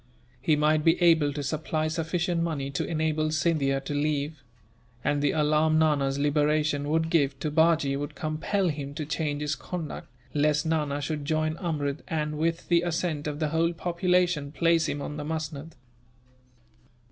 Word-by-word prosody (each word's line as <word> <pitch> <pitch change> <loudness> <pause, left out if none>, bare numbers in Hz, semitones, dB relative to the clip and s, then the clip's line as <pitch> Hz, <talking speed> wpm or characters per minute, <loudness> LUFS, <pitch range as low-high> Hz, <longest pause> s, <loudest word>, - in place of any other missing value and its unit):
He 155 - +3
might 150 +1 +2
be 165 +2 +4
able 165 -4 +4
to 145 0 -4
supply 155 +2 -1
sufficient 165 +2 -1
money 145 -5 -2
to 140 - -1
enable 155 -1 0
Scindia 155 -3 +1
to 135 - -5
leave; 145 0 -1 0.6
and 145 0 +1
the 145 - +2
alarm 155 +1 +2
Nana's 145 -4 +2
liberation 145 0 +1
would 160 +1 +1
give, 140 -5 +2
to 155 - -2
Bajee, 160 -3 +3
would 145 +1 -4
compel 165 +5 -1
him 145 -2 -5
to 155 -1 -3
change 150 -1 -2
his 150 0 0
conduct, 155 +4 -6 0.3
lest 150 +1 +2
Nana 150 -3 0
should 150 0 -3
join 155 +1 0
Amrud 150 -5 -2
and, 150 -3 -2
with 165 +1 -1
the 170 -1 +4
assent 170 -3 -2
of 150 -1 -3
the 155 -1 -1
whole 165 +2 +1
population, 175 -3 +1
place 165 +1 +2
him 145 -1 -3
on 150 - -5
the 150 - -4
musnud. 155 0 -5
155 Hz, 165 wpm, -27 LUFS, 145-165 Hz, 0.6 s, be